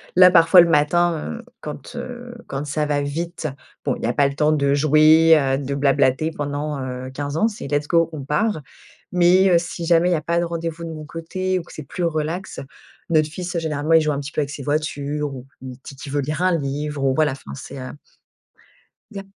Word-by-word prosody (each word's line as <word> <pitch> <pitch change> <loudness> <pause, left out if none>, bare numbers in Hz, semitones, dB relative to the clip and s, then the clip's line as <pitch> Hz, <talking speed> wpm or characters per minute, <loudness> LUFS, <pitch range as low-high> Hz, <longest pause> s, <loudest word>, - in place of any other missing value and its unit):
Là 180 0 +8
parfois 175 +1 +7
le 170 - +4
matin, 165 +4 +2
heu, - - -11 0.2
quand, 150 - -8
heu, 245 0 -7
quand 140 +1 -4
ça 150 +1 -1
va 145 -1 0
vite 165 +3 -4 0.4
bon - - +1
il - - -11
y - - +1
a - - 0
pas 140 - +3
le 140 - -4
temps 150 +1 +2
de 140 -2 +2
jouer, 155 +2 +6
heu, 135 -1 0
de 140 0 -3
blablater 140 +2 +2
pendant, 145 0 -3
heu, 130 0 -6
15 145 +2 -4
ans, 220 - +3
c'est 210 -9 -6
let's 145 +1 -1
go 165 -1 +3
on 145 -3 -6
part, 155 +4 0 0.5
mais, 180 +2 +4
heu, 175 - +6
si 170 0 -6
jamais 170 +1 +4
il - - +2
y - - +3
a 155 - -2
pas 170 +3 0
de - - 0
rendez-vous 165 0 -4
de - - -6
mon 155 -1 -8
côté 185 +4 -3
ou - - -8
que - - -16
c'est 155 - -7
plus 175 +6 -5
relax, 165 +3 -2 0.5
notre 155 -1 +3
fils 175 +2 -5
généralement 155 0 -1
il 160 - +7
joue 155 -1 0
un 140 - -2
petit 145 +1 -6
peu 150 - -1
avec 140 - -3
ses 140 -1 -7
voitures 145 0 -2
ou 125 - -9 0.2
il 130 -1 -8
dit 140 - -9
qui 140 +1 -9
veut 145 +1 0
lire 150 +4 -3
un 180 -2 +3
livre 145 0 -3
ou 135 - +3
voilà, 155 -2 +2
enfin 70 - -10
c'est, 70 - -9
heu 130 - -6 1.2
Il 205 - -8
y - - -3
a - - -16
155 Hz, 240 wpm, -21 LUFS, 145-170 Hz, 1.2 s, Là